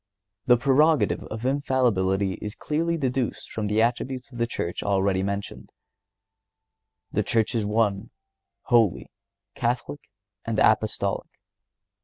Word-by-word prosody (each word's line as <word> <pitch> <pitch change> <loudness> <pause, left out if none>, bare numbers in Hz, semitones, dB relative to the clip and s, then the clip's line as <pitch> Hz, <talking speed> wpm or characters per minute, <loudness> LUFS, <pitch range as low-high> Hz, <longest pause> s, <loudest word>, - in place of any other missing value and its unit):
The 125 -1 +6
prerogative 145 +5 +3
of 110 +2 -6
infallibility 110 -9 +1
is 105 0 -5
clearly 165 +3 -1
deduced 130 -4 -2
from 110 -1 -3
the 105 +2 +2
attributes 125 +2 -2
of 120 - -9
the 115 - +1
Church 85 -6 -4
already 95 -1 +1
mentioned. 100 +1 -4 1.4
The - - +1
Church 115 +1 +1
is 110 -3 0
One, 105 -2 0 0.5
Holy, 105 - +2 0.4
Catholic, 125 +4 -2 0.4
and 115 -1 -3
Apostolic. 110 -2 +1
115 Hz, 115 wpm, -25 LUFS, 100-130 Hz, 1.4 s, The